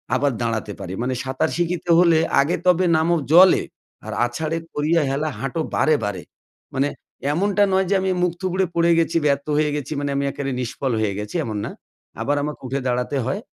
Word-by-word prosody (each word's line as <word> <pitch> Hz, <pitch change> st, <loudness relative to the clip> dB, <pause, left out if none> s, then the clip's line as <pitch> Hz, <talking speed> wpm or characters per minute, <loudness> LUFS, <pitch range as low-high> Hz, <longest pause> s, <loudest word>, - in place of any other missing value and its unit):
আবার 140 Hz, +2 st, +2 dB
দাঁড়াতে 115 Hz, -3 st, -2 dB
পারি। 90 Hz, -, -6 dB
মানে, 130 Hz, +1 st, -1 dB
"সাঁতার 130 Hz, +4 st, -1 dB
শিখিতে 175 Hz, 0 st, -2 dB
হলে 170 Hz, -2 st, +5 dB, 0.2 s
আগে 145 Hz, +5 st, 0 dB
তবে 180 Hz, +1 st, +4 dB
নামো 165 Hz, +2 st, +2 dB, 0.2 s
জলে, 180 Hz, +2 st, +7 dB, 0.4 s
আর -, -, -5 dB
আছাড়ে 155 Hz, +7 st, -3 dB, 0.2 s
করিয়া 155 Hz, +3 st, +2 dB
হেলা 150 Hz, +3 st, -1 dB
হাঁটো 135 Hz, +6 st, -2 dB
বাড়ে, 155 Hz, -1 st, +3 dB
বাড়ে।" 105 Hz, -2 st, -4 dB, 0.5 s
মানে 140 Hz, +2 st, +1 dB, 0.4 s
এমনটা 200 Hz, +4 st, +2 dB
নয় 190 Hz, 0 st, +3 dB
যে 200 Hz, -, +3 dB
আমি 190 Hz, 0 st, 0 dB
মুখ 180 Hz, -1 st, +2 dB
থুবড়ে 185 Hz, 0 st, 0 dB
পড়ে 170 Hz, 0 st, +3 dB
গেছি, 165 Hz, 0 st, +1 dB
ব্যর্থ 140 Hz, 0 st, +1 dB
হয়ে 150 Hz, -1 st, +2 dB
গেছি 145 Hz, -2 st, -5 dB
মানে 145 Hz, -1 st, -2 dB
আমি 140 Hz, -, 0 dB
একেবারে 140 Hz, 0 st, -4 dB
নিষ্ফল 130 Hz, +2 st, -3 dB
হয়ে 105 Hz, -2 st, 0 dB
গেছি 105 Hz, 0 st, -6 dB
এমন 110 Hz, -2 st, -4 dB
না। -, -, -5 dB, 0.5 s
আবার 145 Hz, -, +1 dB
আমাকে 150 Hz, 0 st, -5 dB
উঠে 135 Hz, +2 st, -2 dB
দাঁড়াতে 125 Hz, +3 st, -1 dB
হয়, 140 Hz, +11 st, -2 dB
150 Hz, 190 wpm, -22 LUFS, 130-170 Hz, 0.5 s, জলে